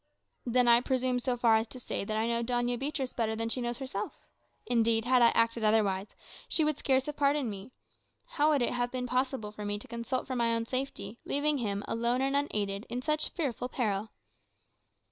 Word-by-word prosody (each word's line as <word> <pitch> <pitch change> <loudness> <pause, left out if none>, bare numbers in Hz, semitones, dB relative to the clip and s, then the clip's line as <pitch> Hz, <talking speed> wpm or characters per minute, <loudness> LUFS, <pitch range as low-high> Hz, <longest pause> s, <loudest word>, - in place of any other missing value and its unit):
"Then, 245 +1 +3
I 235 0 +7
presume 255 -1 0
so 245 0 -1
far 230 -2 +5
as 220 +1 -1
to 255 - -10
say, 240 - -3
that 215 +2 -2
I 220 - +1
know 235 0 +1
Doña 245 0 0
Beatriz 275 -2 -2
better 220 -2 -1
than 225 +1 -2
she 250 - -2
knows 240 0 -2
herself. 245 -7 -5 0.4
Indeed, 230 -1 +2
had 250 0 +4
I 235 - +8
acted 230 0 +2
otherwise, 210 -2 +1 0.3
she 320 - +2
would 300 -1 +1
scarce 265 -2 +2
have 300 - -4
pardoned 280 -4 +2
me. 200 +3 -8 0.6
How 310 -12 +1
would 290 -5 +3
it - - 0
have 245 0 0
been 250 0 -3
possible 250 -3 -1
for 210 0 -8
me 205 0 -2
to 205 - -10
consult 235 +2 -3
for 260 - -4
my 230 -1 +2
own 230 0 -1
safety, 255 -4 -4
leaving 290 0 +1
him 205 -3 -2
alone 235 +3 0
and 275 +1 +1
unaided, 210 -8 -1
in 250 +1 -3
such 305 +1 +1
fearful 260 -6 -3
peril?" 215 -4 -1
240 Hz, 205 wpm, -30 LUFS, 225-260 Hz, 0.6 s, I